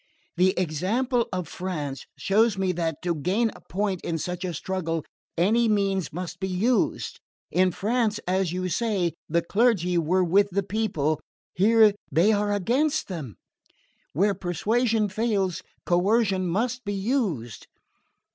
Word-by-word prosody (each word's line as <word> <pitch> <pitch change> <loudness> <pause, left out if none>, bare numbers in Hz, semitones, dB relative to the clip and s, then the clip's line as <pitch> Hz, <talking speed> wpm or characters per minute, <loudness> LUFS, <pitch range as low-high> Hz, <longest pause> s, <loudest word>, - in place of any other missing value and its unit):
"The 185 +2 +3
example 220 - 0
of 185 -2 -3
France 150 -7 -5
shows 215 +1 +2
me 190 -1 +1
that, 165 -3 -3
to 175 -1 +1
gain 190 +9 0
a - - -14
point 195 -2 -2
in 165 - -2
such 180 +3 -4
a 185 - -2
struggle, 165 -2 -3 0.3
any 220 +7 +3
means 195 -3 +1
must 175 +1 -6
be 190 - -2
used! 210 +7 0 0.3
In 185 +1 +3
France, 220 +3 0
as 185 -1 +1
you 185 +1 -2
say, 185 -3 0 0.2
the 170 +1 +1
clergy 195 -4 +2
were 180 +3 +2
with 200 +4 +3
the 200 +1 -1
people 170 -8 -1 0.3
here 215 +2 +5 0.2
they 170 +9 +4
are 205 -1 +1
against 260 - +1
them. 150 - -6 0.8
Where 200 +7 +2
persuasion 215 +5 0
fails 200 -4 -1 0.2
coercion 190 +1 +2
must 240 +8 -1
be 205 -1 -3
used!" 195 - -2
190 Hz, 140 wpm, -25 LUFS, 175-215 Hz, 0.8 s, here